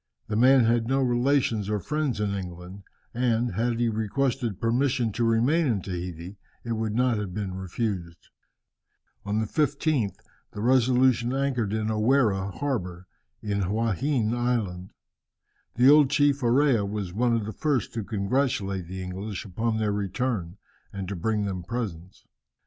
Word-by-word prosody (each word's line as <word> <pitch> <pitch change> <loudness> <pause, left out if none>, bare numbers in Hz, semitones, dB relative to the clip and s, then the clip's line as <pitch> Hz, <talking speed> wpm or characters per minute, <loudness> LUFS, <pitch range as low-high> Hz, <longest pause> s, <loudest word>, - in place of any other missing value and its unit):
The 105 - -1
man 130 +3 +6
had 115 0 +2
no 135 +2 +1
relations 120 -4 +1
or 105 -1 0
friends 150 - -2
in 105 -1 0
England, 90 0 -7 0.3
and, 120 -1 +1
had 115 +3 0
he 120 - +2
requested 115 0 -1
permission 125 0 +1
to 120 - -2
remain 125 +9 +3
in 115 -6 +1
Tahiti, 90 0 -6 0.3
it 120 - -5
would 110 -1 -2
not 125 -1 +2
have 95 -4 -5
been 100 -3 -3
refused. 95 -2 -4 1.0
On 105 +1 0
the 110 - 0
15th, 140 - 0 0.4
the 105 - -5
Resolution 125 0 +3
anchored 130 -6 0
in 110 0 -1
O 110 - -1
Wharre 105 -5 +2
harbour, 90 -10 -3 0.4
in 100 -1 -1
Huaheine 115 +4 0
Island. 110 -7 -1 0.9
The 125 +2 +5
old 150 -2 +6
chief 145 -1 +2
Orea 125 -2 +3
was 100 -3 -4
one 120 +3 +2
of 110 -2 -1
the 110 - -5
first 145 -8 -1
to 115 - -3
congratulate 100 -3 -1
the 95 +1 -6
English 95 +3 -5
upon 110 +4 -1
their 110 -1 0
return, 100 -2 -2 0.3
and 100 -2 -5
to 100 - -3
bring 105 +4 -1
them 95 -2 -3
presents. 95 -4 -6
110 Hz, 155 wpm, -26 LUFS, 100-125 Hz, 1.0 s, man